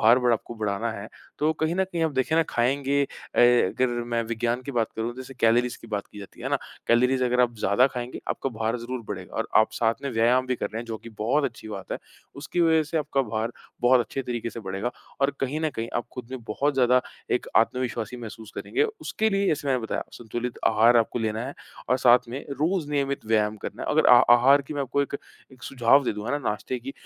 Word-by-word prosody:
भार-वार 120 Hz, +2 st, +5 dB
आपको 115 Hz, +1 st, -3 dB
बढ़ाना 110 Hz, +1 st, -2 dB
है, 100 Hz, 0 st, -7 dB, 0.3 s
तो 155 Hz, +2 st, +2 dB
कहीं 160 Hz, +2 st, -1 dB
न 190 Hz, -, +3 dB
कहीं 170 Hz, -1 st, -1 dB
आप 160 Hz, -, +1 dB
देखें 130 Hz, +4 st, 0 dB
ना, 165 Hz, -, +5 dB
खाएँगे 140 Hz, +3 st, +1 dB
अ, -, -, -7 dB
अगर 120 Hz, 0 st, +4 dB, 0.3 s
मैं 115 Hz, 0 st, +1 dB
विज्ञान 120 Hz, +2 st, -1 dB
की 140 Hz, -, -6 dB
बात 115 Hz, -2 st, +1 dB
करूँ, 115 Hz, +2 st, -2 dB
जैसे 130 Hz, +1 st, -9 dB
कैलोरीज़ 120 Hz, +2 st, +3 dB
की -, -, -12 dB
बात 105 Hz, -2 st, -3 dB
की 105 Hz, -, -13 dB
जाती 100 Hz, -, -11 dB
है -, -, -3 dB
ना, -, -, +2 dB, 0.3 s
कैलोरीज़ 125 Hz, +2 st, +3 dB
अगर 125 Hz, 0 st, +2 dB
आप 120 Hz, -1 st, +2 dB
ज़्यादा 105 Hz, +6 st, +4 dB
खाएँगे, 125 Hz, -2 st, -5 dB
आपका 135 Hz, -, -2 dB
भार 115 Hz, 0 st, -1 dB
ज़रूर 125 Hz, +2 st, -5 dB
बढ़ेगा -, -, -6 dB
और -, -, -1 dB
आप 110 Hz, 0 st, +5 dB
साथ 115 Hz, +1 st, +1 dB
में 140 Hz, -, -2 dB
व्यायाम 120 Hz, +3 st, +3 dB
भी 130 Hz, -, 0 dB
कर -, -, -2 dB
रहे 110 Hz, -, -5 dB
हैं, -, -, -7 dB
जो 115 Hz, -1 st, -4 dB
कि 115 Hz, -, -11 dB
बहुत 135 Hz, +7 st, +1 dB
अच्छी 115 Hz, -4 st, -5 dB
बात 100 Hz, -3 st, -6 dB
है। -, -, -3 dB, 0.4 s
उसकी 155 Hz, +5 st, -3 dB
वज़ह 160 Hz, -1 st, +4 dB
से 160 Hz, -, +1 dB
आपका 140 Hz, -2 st, 0 dB
भार 110 Hz, 0 st, -3 dB, 0.3 s
बहुत 125 Hz, +1 st, +5 dB
अच्छे 135 Hz, +3 st, -3 dB
तरीके 120 Hz, -2 st, -3 dB
से 115 Hz, -, -7 dB
बढ़ेगा, 100 Hz, +4 st, -3 dB, 0.3 s
और 140 Hz, +1 st, +3 dB
कहीं 140 Hz, +4 st, -1 dB
न 155 Hz, -1 st, 0 dB
कहीं, 115 Hz, -3 st, -4 dB
आप 120 Hz, -, -1 dB
खुद 125 Hz, -1 st, -8 dB
में 130 Hz, -3 st, -6 dB
बहुत 140 Hz, +6 st, 0 dB
ज़्यादा 125 Hz, -1 st, +4 dB, 0.3 s
एक -, -, 0 dB
आत्मविश्वासी 125 Hz, -1 st, 0 dB
महसूस 110 Hz, -2 st, -9 dB
करेंगे। 420 Hz, -, -1 dB, 0.2 s
उसके 220 Hz, 0 st, 0 dB
लिए, 195 Hz, 0 st, +1 dB
जैसे 145 Hz, -2 st, 0 dB
मैंने 130 Hz, -2 st, +2 dB
बताया, 110 Hz, -, -2 dB
संतुलित 120 Hz, +1 st, -5 dB
आहार 115 Hz, +2 st, +5 dB
आपको 115 Hz, +1 st, +1 dB
लेना 110 Hz, 0 st, -1 dB
है 140 Hz, -, -6 dB, 0.3 s
और 125 Hz, -, +4 dB
साथ 120 Hz, -1 st, +5 dB
में 130 Hz, +4 st, -5 dB
रोज़ 155 Hz, +3 st, 0 dB
नियमित 140 Hz, -3 st, -1 dB
व्यायाम 110 Hz, -1 st, +2 dB
करना -, -, -7 dB
है। -, -, -4 dB
अगर -, -, +3 dB
आ -, -, +10 dB
आहार 135 Hz, +4 st, +6 dB
की 150 Hz, +2 st, -8 dB
मैं 140 Hz, -, -1 dB
आपको 140 Hz, +2 st, 0 dB
एक 140 Hz, -, -4 dB, 0.4 s
एक 130 Hz, -, -18 dB
सुझाव 135 Hz, +2 st, +3 dB
दे -, -, 0 dB
दूँगा 105 Hz, +1 st, -5 dB
ना, 145 Hz, -, +1 dB
नाश्ते 115 Hz, +4 st, -3 dB
की, 135 Hz, +3 st, -7 dB
125 Hz, 235 wpm, -25 LUFS, 115-140 Hz, 0.4 s, आ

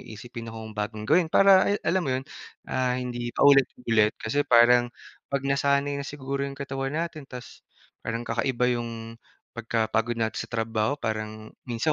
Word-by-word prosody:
isipin 115 Hz, +1 st, -9 dB
akong 110 Hz, -1 st, -8 dB
bagong 105 Hz, 0 st, -4 dB
gawin. 160 Hz, +7 st, +3 dB
Para, 195 Hz, +1 st, +6 dB
ay 205 Hz, -, +2 dB
alam 190 Hz, -, +2 dB
mo 170 Hz, -, -3 dB
yun, 130 Hz, -, -5 dB, 0.4 s
ah, 125 Hz, -1 st, 0 dB
hindi 120 Hz, -1 st, -4 dB
paulit-ulit 125 Hz, -6 st, +4 dB
kasi 115 Hz, +6 st, -1 dB
parang 120 Hz, -2 st, +5 dB, 0.4 s
pag 140 Hz, 0 st, -2 dB
nasanay 140 Hz, +1 st, +1 dB
na 140 Hz, -, -6 dB
siguro 140 Hz, -1 st, -4 dB
yung 140 Hz, -, -9 dB
katawan 135 Hz, +1 st, -4 dB
natin 160 Hz, -4 st, -4 dB
ta's 125 Hz, -1 st, -10 dB, 0.4 s
parang 115 Hz, +1 st, -4 dB
kakaiba 125 Hz, +2 st, 0 dB
yung 115 Hz, 0 st, -7 dB, 0.3 s
pagkapagod 115 Hz, 0 st, -1 dB
natin 110 Hz, -1 st, -1 dB
sa -, -, -6 dB
trabaho 115 Hz, +2 st, -1 dB
parang 110 Hz, -3 st, -5 dB, 0.2 s
minsan 120 Hz, +6 st, 0 dB
125 Hz, 155 wpm, -26 LUFS, 115-140 Hz, 0.4 s, Para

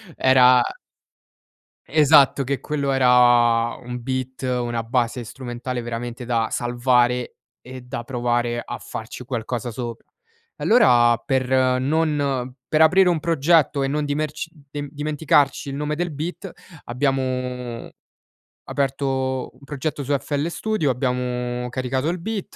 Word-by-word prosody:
era 125 Hz, -1 st, +5 dB, 1.3 s
esatto, 145 Hz, -2 st, +5 dB
che 140 Hz, +1 st, -2 dB
quello 140 Hz, -2 st, -2 dB
era 120 Hz, -3 st, +4 dB
un 125 Hz, 0 st, -6 dB
beat, 130 Hz, +1 st, -4 dB
una 120 Hz, -2 st, -1 dB
base 120 Hz, +1 st, -1 dB
strumentale 125 Hz, +1 st, -5 dB
veramente 120 Hz, +1 st, -5 dB
da 115 Hz, -2 st, 0 dB
salvare 120 Hz, 0 st, +1 dB, 0.2 s
e 130 Hz, 0 st, -10 dB
da 125 Hz, -1 st, -6 dB
provare 120 Hz, -1 st, -1 dB
a -, -, -6 dB
farci 115 Hz, +3 st, -8 dB
qualcosa 120 Hz, -1 st, -4 dB
sopra. 115 Hz, 0 st, -6 dB, 0.5 s
Allora, 120 Hz, -, +5 dB
per 130 Hz, +1 st, -1 dB, 0.3 s
non 140 Hz, -3 st, 0 dB
per 155 Hz, 0 st, +2 dB
aprire 180 Hz, +3 st, +6 dB
un 170 Hz, -, +1 dB
progetto 155 Hz, -2 st, +2 dB
e 135 Hz, -, +1 dB
non 150 Hz, +2 st, -1 dB
dimer 150 Hz, +1 st, -1 dB, 0.4 s
dimenticarci 145 Hz, 0 st, 0 dB
il 135 Hz, -, -5 dB
nome 150 Hz, +1 st, -2 dB
del 175 Hz, +1 st, -2 dB
beat 175 Hz, +6 st, -5 dB, 0.4 s
abbiamo 125 Hz, -2 st, -2 dB, 0.8 s
aperto 135 Hz, -1 st, -1 dB
un 130 Hz, -, -22 dB
progetto 145 Hz, +1 st, -4 dB
su 140 Hz, +2 st, -1 dB
FL 145 Hz, +3 st, -2 dB
Studio, 215 Hz, -3 st, -1 dB
abbiamo 125 Hz, -1 st, -2 dB
caricato 130 Hz, +4 st, -2 dB
il 180 Hz, -, -2 dB
beat, 210 Hz, +2 st, -5 dB
130 Hz, 120 wpm, -22 LUFS, 120-145 Hz, 1.3 s, aprire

